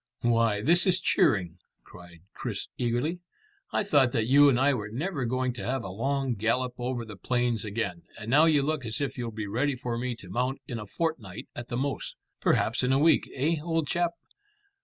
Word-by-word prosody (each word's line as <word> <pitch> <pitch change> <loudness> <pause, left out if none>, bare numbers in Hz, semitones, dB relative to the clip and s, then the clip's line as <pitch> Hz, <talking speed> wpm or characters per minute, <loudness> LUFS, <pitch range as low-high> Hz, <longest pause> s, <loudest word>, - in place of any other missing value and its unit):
"Why, 115 -3 +2
this 170 - +4
is 185 0 +4
cheering," 90 - +2 0.2
cried 85 -1 -14
Chris - - -5
eagerly. 125 +8 -1 0.5
"I - - +1
thought 145 -10 +3
that 110 - +1
you 140 +4 +6
and 125 -3 +2
I 140 +2 +4
were 105 -5 -3
never 140 - -2
going 130 +1 0
to 110 -5 -7
have 130 +3 -1
a 95 - -5
long 135 +5 -1
gallop 115 +4 0
over 120 -1 -2
the 105 -2 -9
plains 120 +2 0
again, 105 -5 -3 0.2
and 110 -1 -8
now 150 +4 +6
you 150 -4 +4
look 155 -1 -1
as 110 -2 -3
if 140 -2 -2
you'll 120 -2 -4
be 110 -1 -5
ready 130 +7 0
for 120 -2 -3
me 125 0 -2
to 100 - -13
mount 125 +8 -1
in 120 - -4
a 105 - -8
fortnight 115 - -4
at 120 0 -6
the 120 - -3
most 140 +2 -3 0.2
perhaps 115 +4 +2
in 125 0 +1
a 135 - +4
week, 160 +3 +3
eh, 155 +5 +1
old 165 -2 -1
chap? 175 -1 0
125 Hz, 205 wpm, -28 LUFS, 115-145 Hz, 0.5 s, you